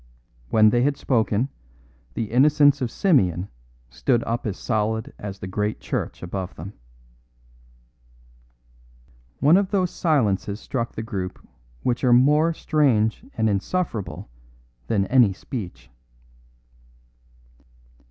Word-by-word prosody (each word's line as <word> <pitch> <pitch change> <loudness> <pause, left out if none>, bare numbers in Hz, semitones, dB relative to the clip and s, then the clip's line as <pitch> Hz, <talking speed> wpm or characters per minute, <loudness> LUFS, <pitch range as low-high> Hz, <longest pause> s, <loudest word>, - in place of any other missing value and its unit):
When 110 +4 +5
they 120 - +2
had 140 +2 +1
spoken, 115 0 0 0.7
the 110 -2 -3
innocence 145 +2 +4
of 125 - -1
Simeon 100 - +1 0.4
stood 115 - +1
up 115 0 -3
as 100 - -3
solid 110 -1 -2
as 100 -1 -6
the 95 - -7
great 105 +3 -2
church - - -4
above 90 0 -5
them. 95 +6 -8 2.7
One 155 +6 +6
of 195 -1 +1
those 185 -4 0
silences 105 - 0
struck 115 -2 -4
the 110 - -5
group 95 -4 -6 0.4
which 120 +1 -1
are 125 -2 +5
more 150 +6 +4
strange 130 -10 +1
and 110 0 +2
insufferable 110 - -2 0.6
than 100 -4 +1
any 120 -3 +4
speech. 90 - -8
115 Hz, 115 wpm, -23 LUFS, 100-140 Hz, 2.7 s, One